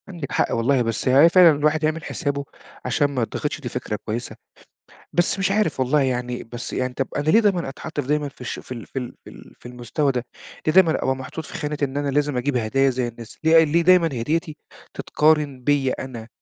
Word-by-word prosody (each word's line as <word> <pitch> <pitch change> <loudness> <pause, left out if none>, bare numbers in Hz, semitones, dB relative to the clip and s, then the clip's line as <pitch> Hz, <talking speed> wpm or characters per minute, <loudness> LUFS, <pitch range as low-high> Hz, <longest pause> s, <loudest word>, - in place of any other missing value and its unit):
عندِك 170 -7 -7
حق - - +1
والله، 125 +3 +2
بس 115 +1 -2
هي 140 +6 +7
فعلًا 175 -1 +7
الواحد 150 +2 +1
يعمل 155 +1 0
حسابه 140 -4 -3 0.4
عشان 135 +4 +2
ما 130 -3 -2
يتضغطش 150 +6 -4
دي 125 - -5
فكرة 120 -3 -4
كويسة. 115 +2 -4 0.8
بس 175 +3 +1
مش 195 0 +1
عارف 205 -9 0
والله 135 +3 +2
يعني 125 -2 -2
بس 120 +1 -8
يعني 125 0 -2
طَب 135 +1 -2
أنا 145 - -1
ليه 220 - +6
دايمًا 195 -9 +1
أتحَط 155 +3 -7
في 135 - -3
دايمًا 150 0 0
في 135 - -20
الش 125 - -5
في - - -15
ال 115 -3 -8
في 135 - -5
ال 125 - -7
في - - -12
ال - - -14
في - - -24
المستوى 125 +4 -1
ده؟ 125 -2 -3 0.4
ليه 155 - +3
دايمًا 185 -3 +6
أبقى 130 - +1
محطوط 130 +4 -7
في - - -12
خانة 150 -1 -3
إن 140 0 -2
أنا 145 0 -1
لازم 145 -1 0
أجيب 130 +1 0
هدايا 135 +4 +2
زي 125 -1 -1
الناس؟ 115 -1 -10
ليه 160 +1 +6
ليه 160 +2 +2
دايمًا 180 -1 +5
هديّتي 155 +4 -2 0.4
تتقارن 150 -3 +1
بيّا 140 -1 +2
أنا؟ 120 -4 -7
140 Hz, 220 wpm, -22 LUFS, 125-155 Hz, 0.8 s, هي